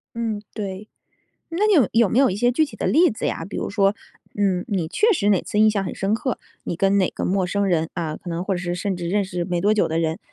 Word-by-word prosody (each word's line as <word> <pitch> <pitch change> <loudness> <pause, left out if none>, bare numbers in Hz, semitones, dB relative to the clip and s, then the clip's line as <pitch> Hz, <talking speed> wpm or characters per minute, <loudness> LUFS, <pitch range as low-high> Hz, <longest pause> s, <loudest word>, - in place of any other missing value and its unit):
嗯， 225 -3 -2
对。 200 0 -5 0.6
那 360 +6 +1
你 425 - +4
有 275 - +5
有 230 -2 +4
没 235 - +1
有 270 - +5
一 190 - -3
些 245 +4 +3
具 310 +6 +2
体 300 - -10
的 - - -2
例 345 +4 +4
子 220 - -4
呀？ 165 - -2
比 195 - -7
如 - - -3
说， 200 -1 +2 0.4
嗯， 190 -3 0
你 185 -6 -1
确 435 - +3
实 205 - +1
哪 195 -4 +3
次 210 - -3
印 215 0 +6
象 200 -2 -1
很 - - -4
深 195 +2 0
刻， 255 +2 -2 0.3
你 - - -3
跟 195 +3 +2
哪 190 -2 +2
个 - - -5
陌 190 0 +1
生 200 +2 0
人 165 -3 0
啊， 160 -3 -3
可 175 - -8
能 170 +1 -2
或 195 0 -1
者 - - -2
是 175 -1 -3
甚 190 +2 -2
至 175 -1 -4
认 205 +3 +1
识 180 -2 -3
没 175 -1 -1
多 205 +4 +3
久 215 - +2
的 160 +1 -1
人， 160 +2 -1
200 Hz, 300 characters per minute, -22 LUFS, 180-220 Hz, 0.6 s, 印